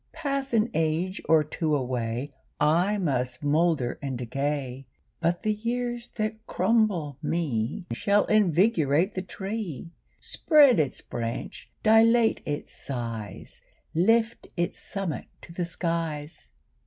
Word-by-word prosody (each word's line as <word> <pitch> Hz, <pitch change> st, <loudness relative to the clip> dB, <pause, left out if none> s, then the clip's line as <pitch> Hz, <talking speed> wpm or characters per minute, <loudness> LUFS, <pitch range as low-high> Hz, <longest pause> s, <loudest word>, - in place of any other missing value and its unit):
Pass 275 Hz, -3 st, -2 dB
an 230 Hz, 0 st, +2 dB
age 165 Hz, +4 st, 0 dB
or 160 Hz, -1 st, +6 dB
two 155 Hz, 0 st, -1 dB
away, 125 Hz, 0 st, -2 dB, 0.3 s
I 175 Hz, +8 st, +3 dB
must 130 Hz, -7 st, -1 dB
moulder 150 Hz, -3 st, +1 dB
and 135 Hz, -3 st, -3 dB
decay, 135 Hz, +1 st, -3 dB, 0.3 s
But 175 Hz, +3 st, 0 dB
the 215 Hz, -1 st, +2 dB
years 240 Hz, +2 st, -3 dB
that 220 Hz, 0 st, -3 dB
crumble 185 Hz, -, +1 dB
me 150 Hz, -, -1 dB
Shall 200 Hz, -, +2 dB
invigorate 180 Hz, -4 st, +3 dB
the 185 Hz, -, -2 dB
tree, 190 Hz, -, -5 dB, 0.3 s
Spread 290 Hz, -, +5 dB
its 145 Hz, -4 st, 0 dB
branch, 115 Hz, +1 st, -5 dB
dilate 225 Hz, +1 st, +5 dB
its 145 Hz, 0 st, -4 dB
size, 115 Hz, -6 st, -6 dB, 0.3 s
Lift 225 Hz, +7 st, +2 dB
its 175 Hz, +3 st, -1 dB
summit 195 Hz, -6 st, -4 dB, 0.2 s
to 170 Hz, -, -11 dB
the 175 Hz, 0 st, -2 dB
skies. 165 Hz, -3 st, -4 dB
170 Hz, 115 wpm, -27 LUFS, 140-215 Hz, 0.3 s, or